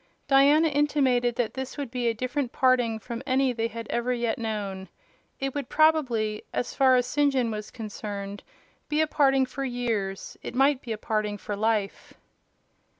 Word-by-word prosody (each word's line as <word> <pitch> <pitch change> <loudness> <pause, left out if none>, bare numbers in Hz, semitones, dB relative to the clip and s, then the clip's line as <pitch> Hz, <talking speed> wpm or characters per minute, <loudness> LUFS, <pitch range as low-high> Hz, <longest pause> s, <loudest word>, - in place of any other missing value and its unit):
Diana 285 +3 +5
intimated 270 -5 +2
that 235 -3 -1
this 265 +2 -6
would 280 -5 -4
be 250 -2 -1
a 230 - +2
different 255 +2 -2
parting 250 -3 +2
from 235 +2 -6
any 260 -1 +2
they 230 -1 -1
had 230 0 -7
ever 240 +1 0
yet 235 -2 -1
known. 200 -4 -4 0.5
It 270 -1 -2
would 285 -4 -4
probably, 250 -9 +2
as 245 - -2
far 265 -2 +5
as 250 -1 +2
St. 285 +3 +2
John 250 -4 0
was 210 -1 -5
concerned, 205 -3 -6 0.5
be 300 - +1
a - - +4
parting 270 -3 +3
for 275 +2 -5
years: 230 -7 -3
it - - -7
might 275 +1 +3
be 235 - -7
a 220 - -2
parting 215 -1 -2
for 205 +1 -5
life. 215 -1 -1
245 Hz, 175 wpm, -26 LUFS, 220-270 Hz, 0.5 s, Diana